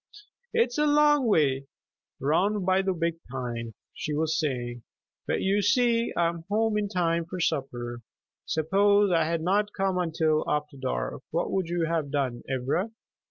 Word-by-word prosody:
"It's 240 +3 +1
a 300 - +3
long 295 -2 +4
way 140 -9 +2 0.5
'round 185 +8 +1
by 190 +1 +3
the 190 0 0
big 170 -2 -1
pine," 120 -3 -5 0.2
she 150 - -3
was 160 +2 0
saying; 120 -5 -2 0.5
"but - - 0
you 200 +2 +2
see 235 +2 +2
I 170 - +3
am 170 -1 -4
home 220 +1 +1
in 210 -1 0
time 170 -3 +1
for 180 +2 -6
supper. 120 -7 -2 0.5
Suppose 200 +5 +3
I 165 -2 +3
had 165 0 -1
not 205 +4 +1
come 190 -2 +1
until 160 -2 +1
after 150 -1 -1
dark. 60 - -3
What - - -1
would 190 -3 0
you 170 -1 0
have 160 -3 -1
done, 135 -4 -1
Ivra?" 135 - 0
170 Hz, 160 wpm, -27 LUFS, 145-200 Hz, 0.5 s, long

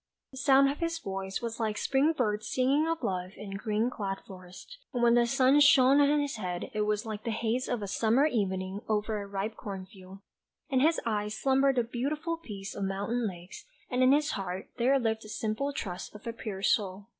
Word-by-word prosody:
The 265 - -11
sound 270 0 +5
of 285 - -7
his 335 0 -1
voice 195 -6 -4
was 230 0 -4
like 215 -2 -1
spring 280 +4 +2
birds 215 -6 -1
singing 275 +5 +2
of 330 0 -2
love 185 0 -2
in 205 -2 -8
green 215 +4 -1
clad 195 -4 -3
forests, 185 - -12
and 245 -3 -1
when 235 0 +5
the 240 0 +4
sun 260 +4 +4
shone 285 -2 +6
on 290 +1 +4
his 285 -4 -2
head 180 -4 -4
it 210 -1 0
was 210 +2 0
like 215 -1 -5
the - - -3
haze 230 +3 -1
of 240 -4 -1
a - - -3
summer's 235 +9 +2
evening 190 -2 -1
over 215 0 0
a 200 - -7
ripe 200 +2 -3
cornfield. 190 -1 -9 0.5
In 260 - +3
his 320 +5 +3
eyes 210 -1 -1
slumbered 270 +1 +3
the 245 - +2
beautiful 295 +8 -2
peace 200 -10 -8
of 200 - -4
mountain 205 +5 -1
lakes, 180 +2 -9 0.3
and 250 0 +1
in 255 +1 +6
his 295 +2 +3
heart 190 -1 -4
there 260 +4 +4
lived 225 -3 -1
the 215 - -11
simple 220 +6 -2
trust 190 -8 -6
of 210 - -12
a 230 - -3
pure 200 -4 -6
soul 200 -3 +1
220 Hz, 210 wpm, -29 LUFS, 200-265 Hz, 0.5 s, shone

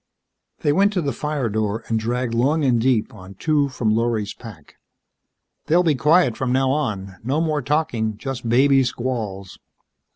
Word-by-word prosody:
They 145 - +2
went 200 +5 +3
to 185 - 0
the 140 -2 -1
fire 150 -2 -2
door 110 +1 -2
and 115 -1 0
dragged 120 +1 -2
long 140 +6 +1
and 120 -3 +2
deep 120 -3 +1
on 95 -2 -12
two 145 +4 +1
from 115 -4 0
Lorry's 110 -2 -1
pack. 100 - -13 0.9
"They'll 175 +3 +4
be 160 -3 +3
quiet 150 -2 +3
from 130 0 -2
now 130 +1 +2
on. 100 -10 -3
No 135 +6 0
more 155 -2 0
talking 120 -7 -1
just 130 -1 -5
baby 135 +3 +4
squalls." 115 -6 -4
125 Hz, 165 wpm, -21 LUFS, 110-145 Hz, 0.9 s, They'll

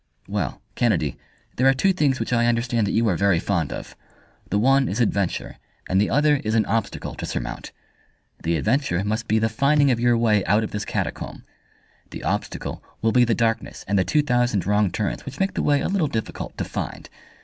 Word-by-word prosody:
"Well, - - -3
Kennedy, 85 - +1 0.4
there 130 - +4
are 135 - +5
two 190 +8 +3
things 145 -7 +1
which - - -2
I 120 0 +3
understand 115 -2 +1
that - - -1
you 115 0 +2
are 95 - +2
very 100 -1 +3
fond 85 -3 -1
of. - - -7 0.5
The 100 - +1
one 135 +4 +3
is 100 - -2
adventure, 100 -6 -1 0.3
and 95 +1 +2
the 105 - +1
other 150 +2 +3
is 110 -4 -2
an 110 -2 +3
obstacle 110 0 -2
to - - -8
surmount. - - -5 0.7
The 85 0 0
adventure 110 - +1
must 110 +3 -2
be 110 - +2
the 110 0 +2
finding 140 +5 +3
of 120 - +1
your 120 0 +3
way 110 -4 +3
out 105 +5 +3
of - - -4
this 105 0 -3
catacomb. - - -4 0.7
The - - -8
obstacle - - -3 0.2
will 115 - +3
be 125 0 +5
the 115 -1 +1
darkness 115 -1 -1
and 100 - 0
the - - +3
two 150 - +2
thousand 120 - +1
wrong 105 0 +2
turns 105 +2 -3
which 140 +1 -8
make 195 0 +1
the - - -1
way 145 -1 +2
a - - 0
little 190 -5 +1
difficult 110 -5 -5
to - - -1
find. - - -5
115 Hz, 210 wpm, -23 LUFS, 105-130 Hz, 0.7 s, are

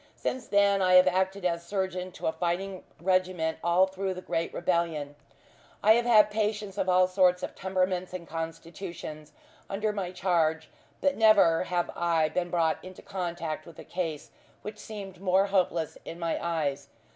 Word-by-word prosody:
Since 255 -2 -3
then 200 -1 +3
I 185 -1 +4
have 180 0 +8
acted 190 +1 0
as 170 -1 0
surgeon 185 -1 -3
to - - -8
a - - +2
fighting 180 +3 -3 0.2
regiment 180 -2 0
all 175 +2 +4
through 190 0 -3
the 185 - -7
great 165 -1 -2
rebellion. 170 -5 -1 0.7
I 215 - +6
have 240 +2 +4
had 215 -3 +6
patients 210 -2 -2
of 190 - 0
all 185 0 +5
sorts 185 -1 +3
of - - -4
temperaments 185 -1 -1
and 180 -2 -7
constitutions 165 -1 -7 0.4
under 210 +2 -1
my 190 -3 -3
charge, 165 -3 0 0.3
but 280 -1 +1
never 205 -7 +5
have 175 -1 -1
I 165 -2 +2
been 175 +1 -2
brought 165 -2 +1
into 185 0 -11
contact 175 -5 -4
with 170 - -13
a - - -9
case 165 -5 -4 0.3
which 210 0 -7
seemed 195 -4 -8
more 190 0 +3
hopeless 180 -5 0
in 165 - -8
my 170 -1 -2
eyes. 145 -5 -1
180 Hz, 170 wpm, -28 LUFS, 170-195 Hz, 0.7 s, have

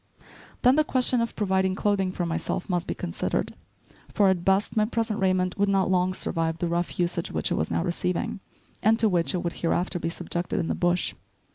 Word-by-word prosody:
Then 255 +3 +5
the 310 - +5
question 255 -4 +2
of 230 - -2
providing 190 -2 +1
clothing 195 -2 +1
for 180 -1 -2
myself 165 +1 -2
must 175 -3 -1
be - - -2
considered, 85 - -2 0.6
for, 200 -2 +4
at 180 -2 0
best, 195 +2 +2
my 215 - +3
present 225 -1 -1
raiment 185 -1 +1
would 200 0 +3
not 190 -1 +2
long 185 0 +2
survive 165 -3 -1
the 175 - -1
rough 170 +1 -2
usage 175 -1 -1
which - - -2
it - - +2
was 80 - -1
now 85 0 0
receiving, 180 +2 -2 0.4
and 220 +2 +4
to 225 - +4
which 180 -2 +1
it 180 - -2
would 170 - -2
hereafter 175 +2 -1
be 165 - -2
subjected 175 +3 -3
in 165 - -2
the - - +1
bush. 175 0 +1
185 Hz, 210 wpm, -26 LUFS, 175-200 Hz, 0.6 s, Then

